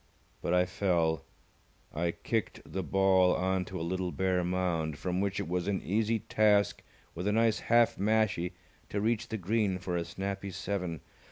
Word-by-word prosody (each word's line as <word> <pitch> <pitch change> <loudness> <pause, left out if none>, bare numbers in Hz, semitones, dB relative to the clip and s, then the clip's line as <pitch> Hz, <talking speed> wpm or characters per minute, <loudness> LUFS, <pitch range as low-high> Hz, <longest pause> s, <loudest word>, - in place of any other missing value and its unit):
But 90 - +1
I 90 0 +4
fell. 85 -5 0 0.7
I 85 +2 0
kicked 110 +5 -2
the 95 - -4
ball 95 -1 +4
on 95 0 0
to 95 -3 -6
a 80 - -2
little 90 +1 -2
bare 95 -1 +1
mound, 85 -4 -1
from 90 +2 -1
which 100 -1 -1
it - - -3
was 90 +1 -1
an 100 -2 +1
easy 110 +4 +1
task 105 -1 +2 0.3
with 90 +4 -4
a - - +3
nice 115 0 +3
half 120 0 +3
mashie 100 -4 +1 0.4
to 100 - -1
reach 110 +1 0
the 110 - -3
green 100 0 0
for 90 -1 -3
a 85 - 0
snappy 100 +2 -4
seven. 90 -4 -3
95 Hz, 175 wpm, -30 LUFS, 90-105 Hz, 0.7 s, I